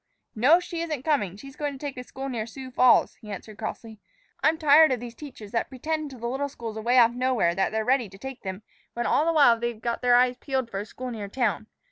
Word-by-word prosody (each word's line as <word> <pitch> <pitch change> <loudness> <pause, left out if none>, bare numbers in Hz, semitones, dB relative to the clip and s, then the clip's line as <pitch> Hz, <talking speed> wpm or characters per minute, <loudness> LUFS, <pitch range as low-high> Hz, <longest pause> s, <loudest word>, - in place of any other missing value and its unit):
"No, 275 +10 +5
she 345 -2 -5
isn't 305 -6 -3
coming; 205 - 0
she's 275 +5 -11
going 290 -1 -3
to - - -9
take 285 0 -5
a 250 - -6
school 265 +2 -7
near 230 -4 -3
Sioux 260 +2 -9
Falls," 255 0 +4
he 215 - -11
answered 205 +2 -8
crossly. 220 0 -6 0.4
"I'm 320 +1 +3
tired 310 0 +6
of 255 - 0
these 240 0 -8
teachers 240 -7 -11
that 230 - -1
pretend 305 +3 -3
to 265 - -11
the 235 - -7
little 270 +4 -2
schools 230 -4 -7
away 235 +3 +1
off 235 -2 +7
nowhere 250 -8 +1
that 190 +2 0
they're 220 0 -1
ready 250 -4 +2
to 195 - -14
take 265 +3 -8
them, 190 +1 -6 0.3
when 240 0 -2
all 305 +6 +2
the - - +4
while 280 -8 +5
they've 235 -1 -3
got 235 +1 -3
their 245 -1 +4
eyes 250 0 +3
peeled 260 -3 -3
for 195 - -3
a 205 - -6
school 255 +2 -7
near 215 -3 -5
town. 220 -1 -1
245 Hz, 250 wpm, -26 LUFS, 220-275 Hz, 0.4 s, off